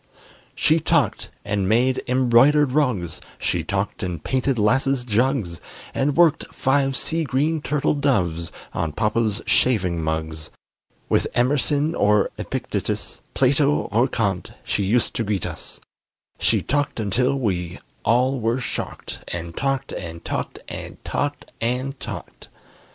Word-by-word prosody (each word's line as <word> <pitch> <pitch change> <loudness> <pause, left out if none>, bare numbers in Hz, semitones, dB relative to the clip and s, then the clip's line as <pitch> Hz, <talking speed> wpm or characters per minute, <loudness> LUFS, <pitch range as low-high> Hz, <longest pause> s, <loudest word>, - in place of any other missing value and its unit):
She 160 +1 +3
talked - - +1 0.2
and 100 -2 0
made 125 +4 +3
embroidered 130 +3 +5
rugs, 125 - 0 0.2
She - - -1
talked - - -2
and 85 -4 -4
painted 130 0 0
'lasses 130 +4 +2
jugs, 115 -6 0 0.3
And 140 +2 0
worked 170 -4 +4
five 135 -1 +1
sea 165 0 0
green 150 +3 0
turtle 150 0 +1
doves 90 - 0 0.2
On 80 -2 -2
papa's 110 +1 0
shaving 90 -9 +2
mugs; 80 0 -3 0.6
With - - +2
Emerson 145 +5 +2
or 105 -6 +3
Epictetus, - - -3
Plato 140 +2 +4 0.2
or 120 +5 +3
Kant, 100 -7 -1
she - - -1
used 110 +5 +1
to 115 - +1
greet 100 -4 -1
us: - - -7 0.6
She - - +2
talked 145 -3 0
until 125 +6 +1
we 90 -9 -1 0.3
all 125 +3 +3
were 115 +3 0
shocked, 125 - -5
And 85 -1 -5
talked 135 -1 -1
and 85 -2 -7
talked - - -3
and - - -7
talked 145 0 -3
and 130 +4 -1
talked! - - -8
125 Hz, 130 wpm, -23 LUFS, 100-135 Hz, 0.6 s, embroidered